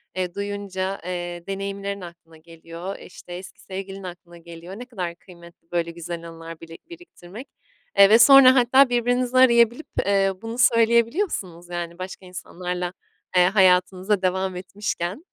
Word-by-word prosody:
eee, 180 -2 -3
duyunca, 200 -1 -4
eee, 175 -1 -5
deneyimlerin 200 0 -4
aklına 170 -2 -13
geliyor, 165 +3 -9
e, - - -12
işte, 180 - -12
eski 180 +2 -10
sevgilin 195 0 -8
aklına 175 -1 -10
geliyor. 170 +2 -11
Ne 245 - -7
kadar 180 -9 -5
kıymetli 170 -1 -18
böyle 170 -1 -1
güzel 170 0 -7
anılar 165 0 -10
bili 165 0 -11
biriktirmek, 270 - -12 0.5
eee, 200 0 +9
ve 220 +2 +7
sonra 260 +1 +8
hatta 260 +2 +5
birbirinizi 245 +1 0
arayabilip, 235 +2 +4 0.2
eee, 195 -1 +2
bunu 225 +1 -6
söyleyebiliyorsunuz 230 - +1
yani 175 0 -5
başka 185 +1 -8
insanlarla, 180 0 -5 0.4
eee, 180 - +6
hayatınıza 185 +1 +3
devam 190 0 -1
etmişken. 190 - -5
190 Hz, 140 wpm, -23 LUFS, 175-220 Hz, 0.5 s, eee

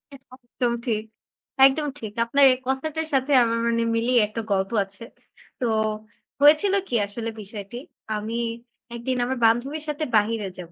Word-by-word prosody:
একদম 255 -2 -5
ঠিক, 215 -3 -1 0.6
একদম 295 +2 +3
ঠিক। 215 -2 -6
আপনার 280 +4 +3
এই - - -4
কথাটার 310 +4 -2
সাথে 270 +2 +1
আমার 230 0 0
মানে 230 0 +1
মিলিয়ে 235 +1 +3
একটা 225 +2 -5
গল্প 195 +2 0
আছে। 200 +4 -8 0.6
তো 245 - +1 0.7
হয়েছিল 310 +7 +6
কি 240 - -2
আসলে 230 +3 -5
বিষয়টি? 205 +3 -8 0.4
আমি 225 +3 -4 0.6
একদিন 250 +2 -2
আমার 260 +1 -2
বান্ধবীর 270 +7 +1
সাথে 300 +1 -2
বাহিরে 210 -1 +1
যাব 175 -1 -9
235 Hz, 145 wpm, -24 LUFS, 220-270 Hz, 0.7 s, হয়েছিল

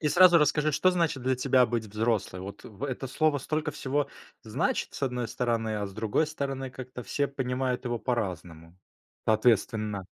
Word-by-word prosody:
И 150 - +1
сразу 175 +2 +7
расскажи, 150 0 +2
что 185 +6 +4
значит 165 -7 0
для 130 +1 +1
тебя 130 -1 +4
быть 115 0 -1
взрослой? 105 -3 -1
Вот 100 +2 -8
в 110 +5 -7
это 135 -1 -3
слово 150 +3 +1
столько 155 +3 -2
всего 140 +1 -1 0.3
значит, - - -1
с - - -8
одной 125 -3 -1
стороны, 115 -3 -1
а 105 -1 -2
с 100 - -9
другой 110 +9 0
стороны, 135 -3 -4
как-то 125 -1 -8
все 140 +3 -1
понимают 130 -2 -2
его 120 -1 -1
по-разному. 90 -8 -4 0.5
Соответственно 110 -3 +2
125 Hz, 170 wpm, -28 LUFS, 110-140 Hz, 0.5 s, сразу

